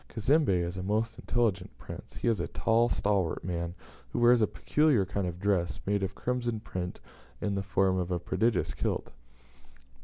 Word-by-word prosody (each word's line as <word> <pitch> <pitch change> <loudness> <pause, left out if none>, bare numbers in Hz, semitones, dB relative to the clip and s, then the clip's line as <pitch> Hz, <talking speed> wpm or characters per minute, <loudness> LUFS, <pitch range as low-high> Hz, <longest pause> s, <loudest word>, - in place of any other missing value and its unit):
Cazembe 110 - +2
is 85 +2 -5
a - - -2
most 110 +4 -1
intelligent 115 -6 0
prince; - - -10
he - - -3
is 115 -5 +2
a 85 - -1
tall, 115 +1 +2
stalwart 100 -8 0
man, 85 0 -3 0.3
who - - -5
wears 120 0 +6
a 110 - +4
peculiar 150 -10 +2
kind 95 0 -2
of 90 0 -5
dress, 90 -6 0
made 100 0 +1
of 95 0 -2
crimson 120 -2 -1
print, 90 -4 -5 0.4
in 100 - -1
the 100 - 0
form 95 -1 +1
of 90 -1 -2
a 90 - 0
prodigious 110 +4 0
kilt. - - -2
100 Hz, 180 wpm, -30 LUFS, 90-115 Hz, 0.4 s, wears